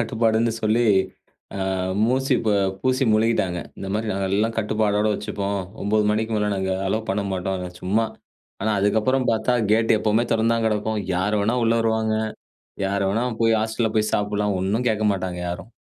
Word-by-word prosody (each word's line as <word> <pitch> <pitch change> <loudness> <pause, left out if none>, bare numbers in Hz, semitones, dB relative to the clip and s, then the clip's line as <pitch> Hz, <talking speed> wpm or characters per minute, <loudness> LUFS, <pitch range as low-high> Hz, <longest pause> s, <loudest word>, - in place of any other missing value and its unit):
கட்டுப்பாடுன்னு 115 0 +1
சொல்லி, 110 +3 +2 0.7
அ - - -3 0.5
மூசி 130 +2 +1 0.5
பூசி 130 +1 +1
முழுகிட்டாங்க. 110 -5 +1 0.2
இந்த 95 - -5
மாரி 110 +1 -2
நாங்க 95 0 -1
எல்லாம் 110 +3 +1
கட்டுப்பாடோட 105 -1 +1
வச்சுப்போம். 100 -1 -3 0.2
9 105 +1 +2
மணிக்கு 110 +1 -1
மேலே 105 0 0
நாங்க 95 0 -1 0.2
அலோ 110 - 0
பண்ண 100 +1 -1
மாட்டோம். 95 0 -2 0.2
சும்மா. 105 +5 +1 0.6
ஆனா 110 - +1
அதுக்கப்புறம் 110 +6 +1
பார்த்தா 110 +3 +1 0.2
கேட்டு 115 +1 +3
எப்போவுமே 110 +2 +2
தெறந்து 115 0 +2
தான் 115 -1 0
கெடக்கும். 110 0 -1
யாரு 100 +4 0
வேணா 110 +4 +1
உள்ளே 115 0 +3
வருவாங்க, 110 -1 +1 0.7
யாரு 100 +1 0
வேணா 115 +5 0 0.2
போய் 115 -1 +4
ஹாஸ்டல்ல 110 0 -1
போய் 110 0 +1
சாப்பிடலாம். 105 -1 0
ஒண்ணும் 110 +6 0
கேட்க 110 -1 0
மாட்டாங்க 90 -2 -4
யாரும். 95 +6 -6
110 Hz, 160 wpm, -23 LUFS, 100-115 Hz, 0.7 s, போய்